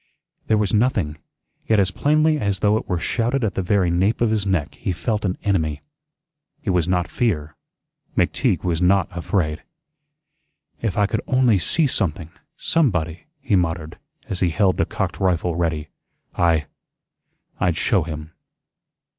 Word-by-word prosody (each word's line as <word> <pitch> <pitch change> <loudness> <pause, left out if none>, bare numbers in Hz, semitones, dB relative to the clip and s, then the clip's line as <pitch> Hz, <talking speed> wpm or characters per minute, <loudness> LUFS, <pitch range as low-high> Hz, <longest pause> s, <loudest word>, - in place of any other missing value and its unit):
There 110 - +3
was 105 -1 0
nothing; 105 -10 +1 0.5
yet 110 -2 +4
as 95 -1 +2
plainly 155 +5 +2
as 100 -5 -1
though 105 0 +3
it 110 - -3
were 90 - +1
shouted 120 +8 0
at 105 - 0
the - - -1
very 95 -1 +2
nape 95 +6 +1
of 115 -2 +2
his 105 -3 0
neck 85 -7 0
he - - -3
felt 105 +6 -2
an 90 -1 -1
enemy. 80 -8 0 0.8
It 100 - 0
was 90 -3 +1
not 90 -1 +1
fear. 80 - -1 0.6
McTeague - - +1
was 85 -2 0
not 95 +1 +2
afraid. 85 -3 -1 1.2
"If 110 -4 -2
I 105 - +4
could - - -1
only 125 -6 +3
SEE 150 - +2
something 85 - -1 0.3
somebody," 90 - 0
he 125 -7 0
muttered, 80 -3 -1 0.3
as 95 - -2
he 90 - +2
held 95 +2 +2
the 85 - +1
cocked 95 -3 -3
rifle 90 -3 +1
ready, 80 -3 -1 0.5
"I 80 -3 +2 0.9
I'd 85 -3 +1
show 100 0 +2
him." 80 -1 -6
95 Hz, 155 wpm, -22 LUFS, 85-105 Hz, 1.2 s, yet